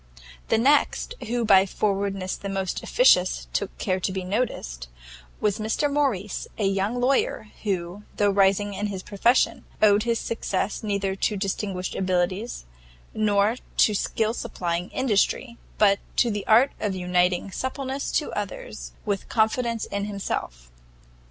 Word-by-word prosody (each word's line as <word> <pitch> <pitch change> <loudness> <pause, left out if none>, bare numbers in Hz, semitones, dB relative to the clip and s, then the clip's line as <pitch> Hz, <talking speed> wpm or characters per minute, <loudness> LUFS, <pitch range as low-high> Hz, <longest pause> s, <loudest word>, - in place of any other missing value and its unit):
The - - +3
next 285 - +2
who 240 0 0
by 195 -2 +6
forwardness 195 -1 -1
the 200 - -6
most 195 -2 -2
officious 185 - +3
took 200 - -2
care 185 -1 -1
to 185 - -1
be 190 0 -3
noticed, 180 - -3 0.5
was 210 -1 0
Mr 225 +7 0
Morrice, 235 -9 -1
a 210 - 0
young 195 +5 0
lawyer, 250 -4 +1
who, 185 -1 -3 0.2
though 205 -1 +3
rising 200 +1 +3
in 205 +2 -2
his 190 -2 -5
profession, 230 +5 +2 0.2
owed 205 -1 +5
his 235 0 0
success 205 -3 -2
neither 200 -2 -1
to 210 +1 0
distinguished 195 -1 -3
abilities, 185 - -1 0.5
nor 210 +1 +2 0.2
to 215 - +5
skill 220 +2 0
supplying 175 -7 -3
industry, 235 0 0 0.2
but 200 -2 +4 0.2
to 235 - +3
the 205 -1 -4
art 240 +6 +6
of 205 -3 -1
uniting 180 +1 +1
suppleness 265 +4 -3
to - - 0
others - - -6
with 200 -2 -2
confidence 230 +1 +1
in 200 0 -3
himself. - - -4
205 Hz, 140 wpm, -25 LUFS, 190-225 Hz, 0.5 s, by